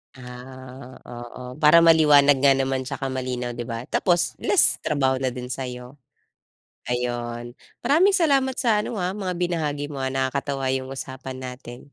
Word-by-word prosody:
Ah, 130 +1 -11
oo, 125 +2 -9
para 155 +2 +6
maliwanag 150 -4 +6
nga 135 +1 +5
naman 135 -1 -1
tsaka 135 +1 -4
malinaw, 125 -2 -4
di 120 - -4
ba, 115 -1 -5
tapos 175 -2 +1
less 400 - +3
trabaho 135 -3 +1
na 130 -1 -2
din 125 0 -7
sa'yo. 125 +1 -6 0.9
Ayun, 120 -1 -3 0.3
maraming 345 +10 +4
salamat 275 -6 +2
sa 225 -4 +2
ano, 215 - -4
ah, 180 -1 -1
mga 190 -3 -4
binahagi 155 -5 -2
mo, 140 - -6
ah. 130 - -1
Nakakatawa 135 0 -2
'yung 130 0 -2
usapan 130 0 -7
natin. 125 -1 -8
135 Hz, 150 wpm, -23 LUFS, 125-160 Hz, 0.9 s, para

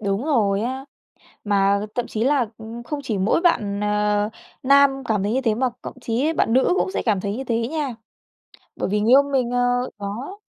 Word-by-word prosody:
Đúng 200 +4 -1
rồi 210 -9 +2
á, 260 +3 -3 0.6
mà 200 -1 +2 0.2
thậm 245 -1 -1
chí 220 +1 -2
là, 270 -2 +2
ừm, 225 +2 -8
không 295 +3 -4
chỉ 220 -6 -2
mỗi 200 - +2
bạn, 205 - +1
ờ, 210 0 +1 0.3
nam 275 0 +4
cảm 210 -4 0
thấy 205 - 0
như 265 - +1
thế 225 -4 +1
mà 255 +1 +1
cộng 255 - -9
chí 260 +8 0
bạn 225 - +1
nữ 260 +7 +4
cũng 375 - 0
sẽ - - -2
cảm 210 -4 +2
thấy 200 +2 -3
như 265 - -4
thế 230 -2 -1
nha. 290 -5 -3 0.8
Bởi - - -2
vì 210 +1 +1
người 220 +3 +2
yêu 275 +2 +7
mình, 265 -4 0
ờ 245 0 +1
đó, 230 - -6
235 Hz, 210 wpm, -22 LUFS, 210-265 Hz, 0.8 s, yêu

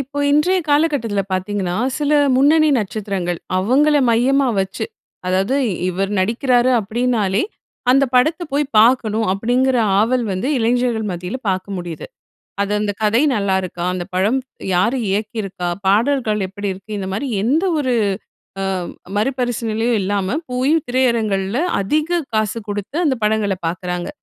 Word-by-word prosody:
இப்போ 275 +2 -6
இன்றைய 355 +6 +3
காலகட்டத்தில 285 -9 +1
பாத்தீங்கன்னா, 185 -1 -2 0.2
சில 295 0 0 0.3
முன்னணி 310 +3 +4
நட்சத்திரங்கள். 195 -4 -3 0.2
அவங்கள 280 +10 +3
மையமா 265 +3 +3
வச்சு. 190 0 -3 0.4
அதாவது 190 +8 +1 0.3
இவர் 195 +2 -2
நடிக்கிறாரு 245 +5 +2
அப்படினாலே 220 -2 0 0.5
அந்த 275 +2 +5
படத்தை 315 +7 +3
போய் 290 +1 +2
பாக்கணும், 225 -2 +3
அப்படிங்கிற 245 +6 +1 0.2
ஆவல் 240 +2 +1
வந்து 190 +9 -2
இளைஞர்கள் 235 -2 +1
மத்தியில 180 +7 -4
பாக்க 185 0 -1
முடியுது. 175 -2 -6 0.6
அது 200 +1 -2
அந்த 205 -1 -1
கதை 225 +6 +3
நல்லாயிருக்கா, 190 -4 -1
அந்த 180 -1 -3
படம் 205 +8 +2 0.4
யாரு 230 +9 +2
இயக்கியிருக்கா, 200 -3 -3 0.2
பாடல்கள் 220 +1 +2
எப்படி 205 +1 -5
இருக்கு, 195 +3 -13
இந்த 190 - -4
மாதிரி 270 +7 -3 0.2
எந்த 295 - +2
ஒரு 260 -4 0 0.7
அ - - -1 0.5
மறுபரிசிலனையும் 235 -1 0
இல்லாம 195 +3 -1
போயி 255 +5 +1
திரையரங்குகள்ல 230 -4 +1 0.2
அதிக 310 - 0
காசு 215 0 0
குடுத்து 205 - -4
அந்த 270 -3 +2
படங்கள 210 -2 +1
பாக்குறாங்க. 180 +1 -3
220 Hz, 125 wpm, -19 LUFS, 195-260 Hz, 0.7 s, அந்த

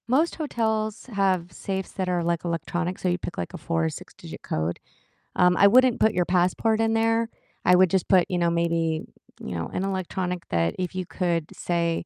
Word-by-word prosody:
Most 290 +8 +2
hotels 220 -8 -2
have 185 -3 +1
safes 190 +1 -4
that 185 -2 -2
are, 175 -1 0
like, 170 -1 -1
electronic, 175 +2 -2
so - - -2
you 175 0 +1
pick, 175 - -7
like, 85 - -4
a - - -5
4 80 -1 -1
or - - +1
six-digit - - -10
code, 80 +2 -2 0.6
um, 180 0 +4
I 200 - +7
wouldn't 255 +3 +5
put 220 - +3
your 180 0 +1
passport 185 +5 +2
in 225 0 +2
there, 225 0 +2 0.4
I 180 - +6
would 185 0 +5
just 190 0 0
put, 185 -2 +5
you 180 - 0
know, 170 -1 +2
maybe, 165 -1 0 0.4
you - - -5
know, 85 -1 -3
an 185 - -1
electronic 185 -2 -3
that 85 -1 0
if 180 -1 -3
you 185 -1 -2
could, 170 -3 -1
say, 170 -1 -1
180 Hz, 205 wpm, -25 LUFS, 170-200 Hz, 0.6 s, I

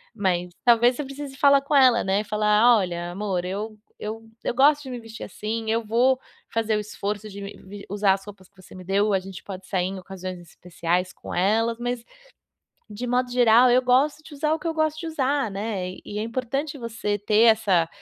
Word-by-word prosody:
Mas 180 -4 0
talvez, 240 +1 +5
você 295 - -3
precise 275 0 -8
falar 280 -1 +5
com 285 +2 -1
ela, 255 -4 +6
né, 195 +2 +1
falar: 210 +3 +4
"Olha, 175 -3 -3
amor, 190 -2 -2
eu 210 +4 -4 0.2
eu 225 +1 -6 0.2
eu - - 0
gosto 290 +3 +4
de 265 - -8
me 245 - -5
vestir 225 -1 -10
assim, 220 +3 -4
eu 230 +1 +1
vou 240 +4 +3 0.4
fazer 225 -1 +1
o - - 0
esforço 210 0 -4
de 200 -1 -9
me 200 0 -8
me 200 +1 -11
usar 200 0 +3
as 195 0 -5
roupas 195 -3 -13
que 200 - -43
você - - -16
me 185 - -10
deu, 200 +2 +2
a 190 - +3
gente 190 -1 -10
pode 190 -1 -8
sair 185 -2 0
em 190 0 -5
ocasiões 185 -1 -7
especiais 175 +1 -3
com - - -8
elas 225 +5 +2
mas, 245 0 -2 0.9
de 215 +4 -5
modo 250 +1 0
geral, 245 0 +6
eu 250 +1 +5
gosto 265 +5 +2
de 305 - -12
usar 300 +2 0
o 320 - +1
que 330 - -8
eu 325 - -2
gosto 315 0 0
de 335 - -5
usar", 280 -5 0
né. 195 -2 -3
E 205 - -6
é 215 - -1
importante 260 +6 -3
você 225 -4 -3
ter 210 +2 +2
essa 195 -7 +1
220 Hz, 215 wpm, -24 LUFS, 195-250 Hz, 0.9 s, ela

